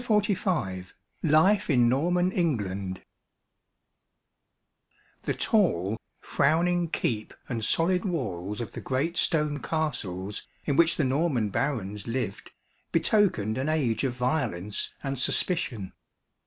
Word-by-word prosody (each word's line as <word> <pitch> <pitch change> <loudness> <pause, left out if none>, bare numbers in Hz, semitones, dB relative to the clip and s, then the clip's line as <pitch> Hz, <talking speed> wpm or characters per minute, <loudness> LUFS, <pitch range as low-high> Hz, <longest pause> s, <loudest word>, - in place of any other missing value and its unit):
Ruskin 185 - +1 0.3
LIFE 165 +7 +4
IN 125 -5 +5
NORMAN 175 +8 +2
ENGLAND 100 - -1 2.2
The - - -2
tall, 115 - +1 0.2
frowning 170 +4 +2
keep 110 -8 -2
and 115 -3 -3
solid 180 - +2
walls 105 - -3
of 115 - -5
the - - -7
great 140 +6 -1
stone 150 -2 +1
castles, 115 - -3 0.2
in 140 - +1
which 165 +2 +5
the 155 - +2
Norman 130 -5 +1
barons 105 -4 -2
lived, 115 -4 -3 0.4
betokened 165 - +2
an 135 +4 -1
age 130 -8 +1
of 130 -3 0
violence 125 - -1
and 135 -2 -3
suspicion. 125 - -1
135 Hz, 110 wpm, -27 LUFS, 105-165 Hz, 2.2 s, IN